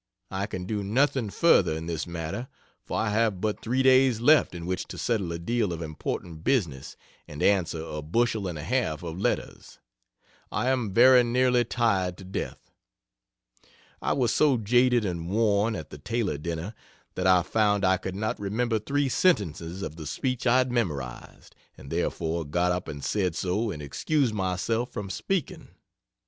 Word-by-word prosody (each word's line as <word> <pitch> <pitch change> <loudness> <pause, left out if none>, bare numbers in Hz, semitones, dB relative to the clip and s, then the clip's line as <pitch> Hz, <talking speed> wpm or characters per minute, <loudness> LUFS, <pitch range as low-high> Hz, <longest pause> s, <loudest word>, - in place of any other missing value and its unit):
I 95 +1 -2
can 95 -3 -5
do 105 +1 -2
nothing 125 +2 +1
further 100 - +4
in 80 - -6
this 85 0 -3
matter, 85 +8 -5 0.4
for - - -4
I 110 - 0
have 110 -3 +1
but 105 +1 -2
3 130 +3 0
days 130 -3 +5
left 145 -4 +4
in 85 -1 -6
which 90 +1 -3
to - - -8
settle 100 -8 -1
a 85 - -3
deal 105 +3 -1
of 85 0 -4
important 80 +1 -5
business 80 - -1 0.3
and 75 - -6
answer 85 -5 +2
a 75 -2 -5
bushel 110 +5 0
and 85 -3 -4
a 75 - -6
half 110 -9 -1
of 85 +1 -5
letters. - - -3 0.7
I 110 +6 0
am 125 -6 0
very 125 +4 +7
nearly 125 +1 +3
tired 100 -7 0
to - - -11
death. 95 +1 -6 1.3
I - - +1
was 125 -4 +1
so 145 -4 +4
jaded 120 +1 +3
and 85 -2 -3
worn, 105 +1 +2
at 80 - -7
the 75 - -9
Taylor 105 -3 -2
dinner, 85 +5 -4 0.4
that 90 0 -1
I 90 -1 +5
found 105 +1 +2
I 95 0 +4
could 95 +1 -6
not 110 +2 -2
remember 110 +3 0
3 140 +6 0
sentences 95 - 0
of 80 -2 -6
the 80 -2 -7
speech 125 - -2
I 125 +1 +5
had 130 -1 +2
memorized, 75 - -4 0.2
and 70 - -11
therefore 85 0 -1
got 85 +4 0
up 90 0 -2
and 70 -2 -7
said 95 -5 0
so 100 +5 -1
and 75 -7 -6
excused 120 - 0
myself 100 +5 -1
from 100 -2 -5
speaking. 185 - -3
100 Hz, 175 wpm, -27 LUFS, 85-120 Hz, 1.3 s, very